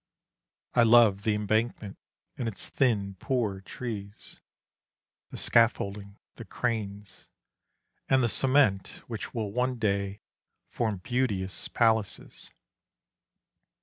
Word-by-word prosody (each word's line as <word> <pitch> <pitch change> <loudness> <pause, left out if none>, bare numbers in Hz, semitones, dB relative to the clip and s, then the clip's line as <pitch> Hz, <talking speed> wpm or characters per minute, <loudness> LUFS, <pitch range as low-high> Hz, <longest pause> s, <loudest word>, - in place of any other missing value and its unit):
I 120 - +4
love 115 -4 +6
the 105 0 +1
Embankment 105 0 -1 0.4
and 120 - -3
its 110 - -5
thin 100 -7 0
poor 110 -7 -1
trees; 105 -1 -7 0.9
The - - -8
scaffolding, 100 -3 +1 0.2
the - - -7
cranes, 105 -4 -4 0.8
and 130 -1 +4
the - - +3
cement 130 -5 +2
Which 115 -1 -6
will 110 -3 -2
one 125 +2 0
day 100 -2 -1 0.5
form 110 -6 -2
beauteous 105 -7 -1
Palaces. 110 -3 0
110 Hz, 100 wpm, -28 LUFS, 100-120 Hz, 0.9 s, love